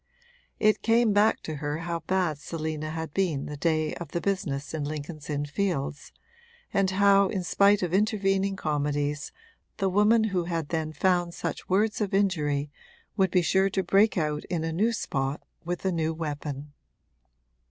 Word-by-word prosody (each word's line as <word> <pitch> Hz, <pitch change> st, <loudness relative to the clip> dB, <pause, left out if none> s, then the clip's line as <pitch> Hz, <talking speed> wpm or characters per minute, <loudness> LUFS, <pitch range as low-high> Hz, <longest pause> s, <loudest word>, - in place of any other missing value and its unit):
It 215 Hz, 0 st, +3 dB
came 230 Hz, -1 st, +3 dB
back 210 Hz, +2 st, +3 dB
to 155 Hz, -2 st, -5 dB
her 145 Hz, +1 st, -2 dB
how 170 Hz, -1 st, -2 dB
bad 170 Hz, -2 st, 0 dB
Selina 155 Hz, -1 st, -4 dB
had 160 Hz, -1 st, -5 dB
been 170 Hz, -8 st, 0 dB
the 150 Hz, -, -6 dB
day 155 Hz, 0 st, 0 dB
of 170 Hz, -4 st, -8 dB
the 170 Hz, -, 0 dB
business 165 Hz, -8 st, -2 dB
in 155 Hz, -2 st, -2 dB
Lincoln's 150 Hz, +1 st, -6 dB
Inn 145 Hz, -1 st, -1 dB
Fields, 145 Hz, -3 st, -2 dB, 0.6 s
and 195 Hz, -2 st, +2 dB
how 200 Hz, +1 st, +5 dB
in 190 Hz, -2 st, -2 dB
spite 200 Hz, +2 st, +4 dB
of 175 Hz, -1 st, -2 dB
intervening 195 Hz, -1 st, +1 dB
comedies 145 Hz, -2 st, -1 dB, 0.5 s
the 195 Hz, -, +1 dB
woman 210 Hz, +4 st, +4 dB
who 180 Hz, -2 st, +1 dB
had 165 Hz, -3 st, -3 dB
then 160 Hz, -2 st, -2 dB
found 175 Hz, +2 st, +1 dB
such -, -, -5 dB
words 210 Hz, +4 st, +2 dB
of 200 Hz, -2 st, 0 dB
injury 150 Hz, -7 st, +1 dB, 0.4 s
would 190 Hz, -1 st, +3 dB
be 180 Hz, 0 st, +2 dB
sure 190 Hz, +3 st, +3 dB
to 190 Hz, 0 st, -1 dB
break 195 Hz, +4 st, +3 dB
out 150 Hz, -2 st, -1 dB
in 170 Hz, -3 st, -2 dB
a 165 Hz, 0 st, -2 dB
new 215 Hz, +8 st, +2 dB
spot 135 Hz, -9 st, -2 dB, 0.2 s
with 175 Hz, +2 st, -4 dB
a 190 Hz, -, +2 dB
new 160 Hz, -2 st, -1 dB
weapon. 145 Hz, -2 st, -5 dB
170 Hz, 170 wpm, -27 LUFS, 150-195 Hz, 0.6 s, how